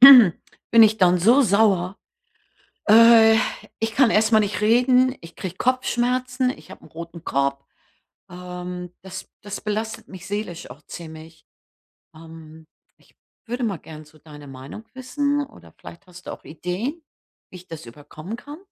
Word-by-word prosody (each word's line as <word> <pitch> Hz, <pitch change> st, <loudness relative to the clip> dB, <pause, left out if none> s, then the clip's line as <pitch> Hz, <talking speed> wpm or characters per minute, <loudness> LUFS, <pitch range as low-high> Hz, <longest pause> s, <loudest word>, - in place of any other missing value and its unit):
bin 230 Hz, -3 st, +7 dB
ich 220 Hz, 0 st, +4 dB
dann 180 Hz, -1 st, +4 dB
so 235 Hz, +10 st, +5 dB
sauer, 200 Hz, -3 st, +2 dB, 0.9 s
äh 225 Hz, 0 st, +8 dB, 0.4 s
ich 225 Hz, 0 st, -2 dB
kann 260 Hz, -4 st, +4 dB
erstmal 220 Hz, +1 st, +4 dB
nicht 205 Hz, -2 st, -2 dB
reden, 250 Hz, +3 st, +3 dB
ich 165 Hz, 0 st, -14 dB
kriege 185 Hz, -2 st, -6 dB
Kopfschmerzen, 255 Hz, 0 st, 0 dB
ich -, -, -11 dB
habe -, -, -12 dB
'nen -, -, -16 dB
roten 170 Hz, 0 st, -9 dB
Kopf. 140 Hz, 0 st, -1 dB, 0.7 s
Ähm, 180 Hz, 0 st, -7 dB
das 190 Hz, 0 st, -9 dB
das 205 Hz, 0 st, -6 dB
belastet 215 Hz, +1 st, -4 dB
mich 185 Hz, -2 st, -11 dB
seelisch 200 Hz, -7 st, -5 dB
auch 140 Hz, +4 st, -13 dB
ziemlich. 160 Hz, 0 st, -11 dB, 0.7 s
Ähm, 160 Hz, -1 st, -13 dB, 0.3 s
ich -, -, -28 dB, 0.3 s
würde 245 Hz, +2 st, -3 dB
mal 200 Hz, -6 st, -1 dB
gerne 155 Hz, 0 st, -12 dB
so 155 Hz, +1 st, -21 dB
deine 150 Hz, -1 st, -13 dB
Meinung 135 Hz, +11 st, -10 dB
wissen 285 Hz, +2 st, -1 dB
oder 285 Hz, -, -18 dB
vielleicht 185 Hz, +3 st, -13 dB
hast 180 Hz, 0 st, -14 dB
du -, -, -4 dB
auch -, -, -13 dB
Ideen, 195 Hz, -, -5 dB, 0.5 s
wie 185 Hz, -, -10 dB
ich 180 Hz, +1 st, -16 dB
das 165 Hz, -7 st, -9 dB
überkommen 150 Hz, -, -9 dB
kann? 290 Hz, +4 st, -10 dB
195 Hz, 150 wpm, -22 LUFS, 165-235 Hz, 0.9 s, äh